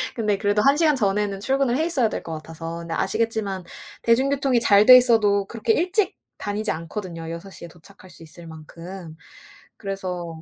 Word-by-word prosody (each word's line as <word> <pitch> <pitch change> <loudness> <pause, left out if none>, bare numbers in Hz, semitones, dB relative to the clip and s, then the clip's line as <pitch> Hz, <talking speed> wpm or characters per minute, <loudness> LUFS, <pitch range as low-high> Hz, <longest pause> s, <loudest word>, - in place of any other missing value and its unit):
근데 210 -4 0
그래도 205 +1 +1
1 275 +5 +4
시간 310 -2 +3
전에는 200 -2 0
출근을 265 +2 0
해 315 - 0
있어야 270 -10 +1
될 - - -5
것 165 - -6
같아서 165 +1 -7
근데 165 -1 -6
아시겠지만 215 -5 -2 0.4
대중교통이 265 +2 +2
잘 205 -2 +5
돼 255 - +10
있어도 215 -5 +3
그렇게 230 0 -1
일찍 370 - 0 0.2
다니지 210 +1 -3
않거든요 165 0 -6
6:00 170 +1 -9
에 - - -9
도착할 185 +3 -17
수 165 - -13
있을 165 +1 -13
만큼. 165 +2 -10 0.6
그래서 180 -5 -6
200 Hz, 365 characters per minute, -23 LUFS, 170-235 Hz, 0.6 s, 돼